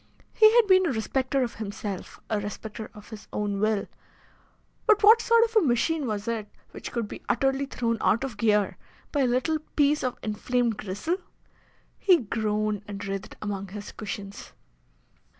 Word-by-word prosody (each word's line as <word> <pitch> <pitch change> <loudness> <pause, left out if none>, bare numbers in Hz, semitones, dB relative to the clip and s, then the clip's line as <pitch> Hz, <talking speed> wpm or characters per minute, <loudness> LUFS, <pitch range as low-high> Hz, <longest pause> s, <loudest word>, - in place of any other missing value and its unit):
He 435 0 +7
had 475 -2 +7
been 375 -2 +5
a - - +1
respecter 260 +3 0
of 240 - -3
himself, 205 -2 -6
a 215 - 0
respecter 210 +1 -6
of 210 0 -13
his 220 -1 -9
own 205 -1 -2
will; 215 -1 +1 1.0
but 435 -1 +5
what 445 +2 +8
sort 465 0 +5
of 460 0 -2
a - - +7
machine 290 +1 +1
was 210 -1 -3
it 220 -3 -2 0.2
which - - -7
could 235 -3 -2
be - - -9
utterly 270 +2 +1
thrown 230 -4 -1
out 230 - +2
of 265 -5 -4
gear 210 -2 +2 0.3
by 290 - 0
a 265 - +3
little 260 +6 +1 0.2
piece 295 0 +3
of 255 -1 -2
inflamed 230 +1 0
gristle? 210 - -2 0.8
He 370 -3 +6
groaned 215 -3 -1
and 200 -1 -6
writhed 195 +1 -5
among 200 -2 -3
his 205 +2 -8
cushions. 200 -1 -7
225 Hz, 170 wpm, -27 LUFS, 210-280 Hz, 1.0 s, what